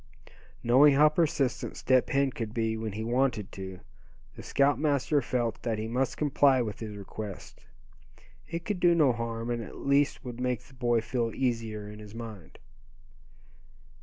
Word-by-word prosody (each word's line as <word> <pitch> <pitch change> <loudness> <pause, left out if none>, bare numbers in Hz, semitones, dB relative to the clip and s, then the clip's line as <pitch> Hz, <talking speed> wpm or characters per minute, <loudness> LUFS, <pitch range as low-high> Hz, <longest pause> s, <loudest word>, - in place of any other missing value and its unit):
Knowing 135 +4 +6
how 150 +2 +7
persistent 150 -4 0
Step 130 -1 +2
Hen 140 0 +2
could 115 -3 -5
be 110 -1 0
when 110 -2 -4
he 110 +2 -4
wanted 120 -3 0
to, 95 -1 -8 0.5
the - - -9
scoutmaster 145 0 +2
felt 120 -2 -2
that 115 -2 -1
he 110 +1 -3
must 125 +3 -1
comply 140 -2 +3
with 110 -4 -3
his 105 -2 -6
request. 100 0 -8 0.8
It 170 0 -5
could 205 -4 -2
do 175 -1 +5
no 145 -6 +4
harm, 115 0 -3
and 120 -1 -2
at 110 - -9
least 140 0 +1
would 120 -1 -6
make 125 -2 -1
the 135 - -19
boy 120 -2 +1
feel 115 0 -1
easier 115 -5 -2
in 105 0 -10
his 105 0 -11
mind. 110 -7 -9
120 Hz, 165 wpm, -29 LUFS, 110-140 Hz, 0.8 s, how